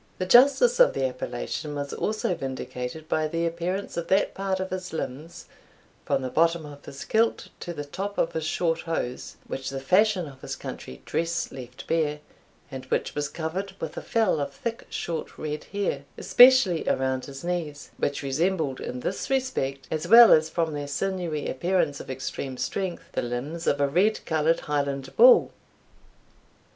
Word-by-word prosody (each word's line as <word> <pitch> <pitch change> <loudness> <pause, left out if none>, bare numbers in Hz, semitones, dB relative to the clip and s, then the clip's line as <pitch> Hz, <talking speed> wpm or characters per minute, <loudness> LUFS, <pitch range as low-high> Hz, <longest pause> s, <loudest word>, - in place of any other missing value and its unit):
The 185 - -2
justice 285 - +6
of - - +6
the 135 - 0
appellation 130 +4 -4
was 140 -1 -4
also 215 -3 -1
vindicated 135 +1 -5
by 155 0 +1
the 165 +2 -1
appearance 170 +3 -3
of 170 - -3
that 190 +1 +2
part 195 -1 -2
of 190 0 -4
his 185 0 -4
limbs, 155 +2 -6 0.6
from - - 0
the 130 - -3
bottom 165 0 +2
of 145 -1 -11
his 135 - -9
kilt 225 +1 +1
to 175 - -5
the 145 -3 -5
top 200 +7 -5
of - - +1
his 160 - -2
short 165 +1 0
hose, 145 -7 -4
which 135 0 -4
the 135 0 -4
fashion 185 +6 +3
of 135 -2 -13
his - - -5
country 65 - -8
dress 170 +1 -1
left 125 -1 -9
bare, 150 -2 0 0.5
and 130 -1 -7
which - - -1
was 145 -1 -2
covered 185 +4 -4
with - - -5
a - - -4
fell 220 -8 +1
of 140 0 -3
thick, 230 - -5
short, 165 -2 -4
red 150 0 -4
hair, 190 -9 -2
especially 245 -9 +6
around 130 -1 0
his 135 +1 -9
knees, 165 -5 -4
which 145 0 -1
resembled 155 0 0
in 125 0 -5
this 190 - -3
respect, 195 - -1
as 160 +2 -2
well 230 +3 +9
as 160 0 +5
from 165 -2 -1
their 145 -1 -4
sinewy 165 0 -2
appearance 160 0 0
of - - -9
extreme 130 0 -5
strength, 190 +3 -3
the - - -1
limbs 135 +8 -4
of 145 - +2
a 140 - +3
red 190 +9 +2
coloured 160 +1 +1
Highland 140 -2 -2
bull. - - +7
160 Hz, 175 wpm, -26 LUFS, 140-185 Hz, 0.6 s, well